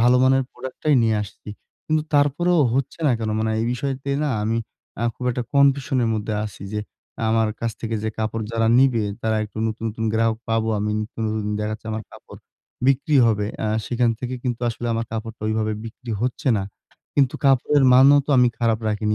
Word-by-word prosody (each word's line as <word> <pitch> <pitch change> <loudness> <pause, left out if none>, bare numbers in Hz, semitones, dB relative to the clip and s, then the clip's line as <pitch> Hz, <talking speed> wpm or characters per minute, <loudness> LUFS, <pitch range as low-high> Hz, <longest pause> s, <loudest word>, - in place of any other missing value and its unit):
ভালো 125 +2 +5
মানের 135 0 +4
product 130 -1 -8
টাই 150 - +4
নিয়ে 110 -1 +2
আসছি। 105 +1 -11 0.4
কিন্তু 155 0 +1
তারপরেও 160 +5 +3 0.2
হচ্ছে 135 +4 -2
না 130 - +4
কেন? 110 -1 -2
মানে 110 0 0
এই - - 0
বিষয়তে 135 +2 -3
না 145 - 0
আমি 115 +2 0 0.4
আ - - -1
খুব 125 - -8
একটা 125 0 -2
কনফিউশন 140 -2 +3
এর - - +1
মধ্যে 105 0 -2
আছি 105 -2 -8
যে 105 - -1 0.5
আমার 110 -1 +2
কাছ 115 -1 -1
থেকে 115 -1 -3
যে 110 - -1
কাপড় 110 +1 -2
যারা 115 -1 +1
নিবে 130 -5 +4 0.2
তারা 110 -1 +1
একটু 105 +1 -10
নতুন, 110 +1 -4
নতুন 110 +1 -4
গ্রাহক 115 0 +1
পাবো 115 0 +1
আমি 105 +1 -1
নতুন, 110 +1 -6
নতুন 105 -1 -2
দেখা 105 0 -2
যাচ্ছে - - -13 0.3
কাপড় - - -13 0.5
বিক্রি 140 +2 +3
হবে। 105 -2 +1 0.2
আ - - 0 0.2
সেখান 120 -1 +1
থেকে 125 0 -4
কিন্তু 120 -2 -2
আসলে 120 +1 -4
আমার 115 0 -1
কাপড়টা 110 0 -5
ঐভাবে 110 0 0
বিক্রি 115 +1 -9
হচ্ছে 125 +2 -1
না। 100 - -1 0.5
কিন্তু 135 -3 +3
কাপড়ের 135 +1 +4
মানও 135 +3 +7
তো - - -2
আমি 125 -1 +6
খারাপ 115 -2 +2
রাখিনি। 105 0 0
115 Hz, 195 wpm, -22 LUFS, 110-130 Hz, 0.5 s, মানও